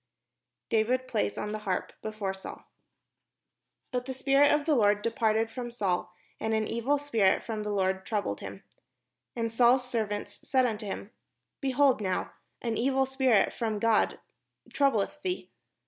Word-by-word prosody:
] 125 0 -59
DAVID 245 +4 +2
PLAYS 105 - -1
ON 210 - -3
THE 215 - -3
HARP 190 -4 -2
BEFORE 215 -3 -3
SAUL 190 - -9 1.3
But 250 0 -2
the 265 - -4
spirit 275 +2 +4
of 295 -1 +2
the 315 - +3
Lord 205 -5 +3
departed 225 -1 +1
from 245 0 -5
Saul, 195 -7 -1 0.3
and 220 0 0
an 215 -1 0
evil 245 +5 +1
spirit 230 -10 +2
from 220 -2 -4
the 210 - -3
Lord 190 -2 0
troubled 200 - -2
him. 95 0 -8 0.7
And 230 -1 -1
Saul's 245 +2 +4
serv 225 -4 -1
ants 205 0 -5
said 260 -1 +2
unto 215 -3 -2
him: 195 +2 -5 0.5
"Behold 270 -2 +3
now, 185 -2 -1 0.3
an 230 -2 -1
evil 265 +2 +2
spirit 265 -5 +3
from 220 -3 -2
God 225 +1 +2 0.5
troubleth 275 -1 +1
thee. 365 +1 -3
225 Hz, 160 wpm, -29 LUFS, 205-255 Hz, 1.3 s, spirit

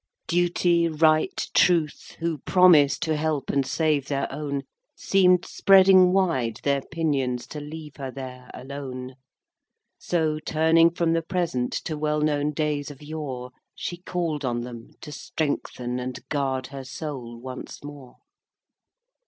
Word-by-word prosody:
IV. - - -52
Duty, 175 0 +2
Right, 155 0 +2
Truth, 165 -5 +2
who 165 -2 -2
promised 155 -5 +5
To 160 -1 0
help 150 -2 -1
and 140 -1 +2
save 150 -1 0
their 140 -1 -1
own, 140 -1 -3 0.3
Seem'd 180 -2 +3
spreading 190 -2 +6
wide 160 - +1
their 140 -1 +1
pinions 135 -7 -1
To 150 - -7
leave 150 0 -9
her 135 -2 -5
there 125 -1 -9
alone. 130 -1 -7 0.9
So, 160 -3 0
turning 160 +2 +4
from 170 -1 0
the 165 - +1
Present 165 -8 -1
To 155 -3 -3
well 150 0 0
known 150 -1 +1
days 150 -1 -2
of 145 0 -12
yore, 140 -5 -6 0.2
She 175 - -5
call'd 170 -4 -3
on 120 -2 -1
them 120 -1 -8
to 150 - -8
strengthen 125 -5 -3
And 125 0 -6
guard 135 -3 -1
her 135 -1 -6
soul 130 -4 -6
once 130 +2 -8
more. 145 -3 -10
150 Hz, 140 wpm, -25 LUFS, 130-165 Hz, 0.9 s, spreading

